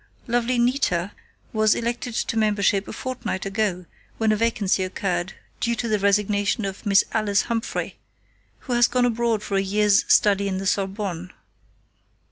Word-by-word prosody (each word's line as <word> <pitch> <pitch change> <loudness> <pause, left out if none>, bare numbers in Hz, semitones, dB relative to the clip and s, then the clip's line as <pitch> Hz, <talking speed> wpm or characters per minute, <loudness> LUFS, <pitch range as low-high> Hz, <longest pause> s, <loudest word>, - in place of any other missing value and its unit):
"Lovely 240 +1 0
'Nita' 235 -7 +1 0.4
was 215 -1 +3
elected 235 0 -3
to 230 - -1
membership 205 -2 +1
a - - -6
fortnight 255 -7 -4
ago, 195 -3 -1 0.3
when 220 -1 +2
a - - +3
vacancy 210 -4 +1
occurred, 185 0 -2 0.3
due 235 0 0
to 235 - -3
the 215 -2 +1
resignation 200 +1 +1
of 195 +2 -6
Miss 195 -1 +5
Alice 205 -3 +1
Humphrey, 230 -1 -3 0.6
who 250 - -4
has 240 0 +5
gone 250 0 +1
abroad 230 -2 0
for 200 -2 -1
a - - +3
year's 205 +1 +2
study 200 -1 +4
in 190 -1 -2
the 195 - -4
Sorbonne. 190 -3 -2
210 Hz, 155 wpm, -23 LUFS, 195-230 Hz, 0.6 s, Miss